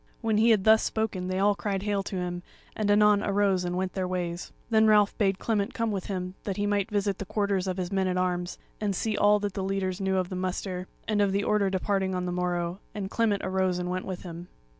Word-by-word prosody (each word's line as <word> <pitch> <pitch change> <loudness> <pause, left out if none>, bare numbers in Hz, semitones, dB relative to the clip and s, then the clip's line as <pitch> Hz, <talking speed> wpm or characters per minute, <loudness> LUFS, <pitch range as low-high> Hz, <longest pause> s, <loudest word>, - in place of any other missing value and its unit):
When 220 -2 +1
he 225 +2 +5
had 215 -4 +4
thus 220 +1 +6
spoken 210 -5 -2
they 185 0 -1
all 205 +2 +4
cried 200 -1 -3
hail 205 -1 0
to 195 - -6
him, 175 -1 -3 0.3
and 215 -1 -1
anon 210 0 +5
arose 200 -2 +2
and 180 0 -2
went 185 0 -2
their 185 -1 -1
ways. 175 -1 -3 0.2
Then 220 0 +5
Ralph 210 -1 +4
bade 195 -3 +2
Clement 205 -1 -1
come 230 -1 0
with 195 -3 -3
him 185 -2 -3
that 195 -2 -3
he 205 - 0
might 205 -1 0
visit 200 -2 0
the 200 - -4
quarters 200 -1 0
of 185 0 -2
his 180 0 -3
men 190 -1 +1
at 185 0 0
arms, 180 -1 -1 0.2
and 205 -2 -1
see 220 - -1
that - - -2
all 210 0 +6
the 200 -1 -3
leaders 190 0 -2
knew 190 0 +1
of 185 -1 0
the 185 - -4
muster, 185 0 -3 0.2
and 210 -2 +2
of 200 -1 +3
the 200 +1 0
order 210 -2 +2
of 190 - -3
departing 190 0 0
on 180 0 -2
the 180 - -2
morrow; 175 0 -1 0.2
and 200 -1 -4
Clement 215 -4 +1
arose 185 -1 +1
and 180 0 -3
went 185 0 -3
with 185 -2 -5
him. 175 -1 -8
195 Hz, 250 wpm, -27 LUFS, 185-205 Hz, 0.3 s, thus